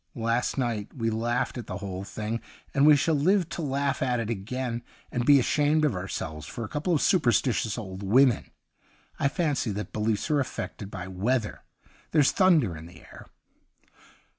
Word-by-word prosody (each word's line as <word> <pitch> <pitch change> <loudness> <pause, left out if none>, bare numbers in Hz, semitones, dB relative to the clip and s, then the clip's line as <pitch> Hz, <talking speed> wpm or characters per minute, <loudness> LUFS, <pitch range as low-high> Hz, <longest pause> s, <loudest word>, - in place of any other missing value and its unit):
Last 115 +2 0
night 115 -5 -2
we 115 -3 -1
laujjhed 120 +3 -1
at 115 - -8
the 95 - -4
whole 95 -2 -5
thing, 110 +3 -4 0.3
and 140 +1 +4
we 150 - +9
shall 160 +3 +1
live 175 +5 +3
to 170 0 -5
laugh 140 -1 -1
at 125 -2 +1
it 115 0 -2
again, 120 +3 -3 0.3
and 120 -1 -2
be 145 -1 +8
ashamed 150 +4 +2
of 150 - +1
ourselves 80 -5 -5
for 115 - -6
a - - -4
couple 155 - -1
of 145 - +1
superstitious 120 - +2
old 95 -4 -6
women. 120 +4 +3 0.7
I - - +3
fancy 145 -5 0
that 105 +2 -5
beliefs 110 +6 -1
are 150 - +3
affected 110 -6 -4
by 95 -3 -6
weather 105 +5 -1 0.2
— - - -30
there's 150 -4 +5
thunder 165 - +3
in 80 +1 -9
the 90 - -14
air.' - - -14
120 Hz, 180 wpm, -27 LUFS, 105-140 Hz, 0.7 s, we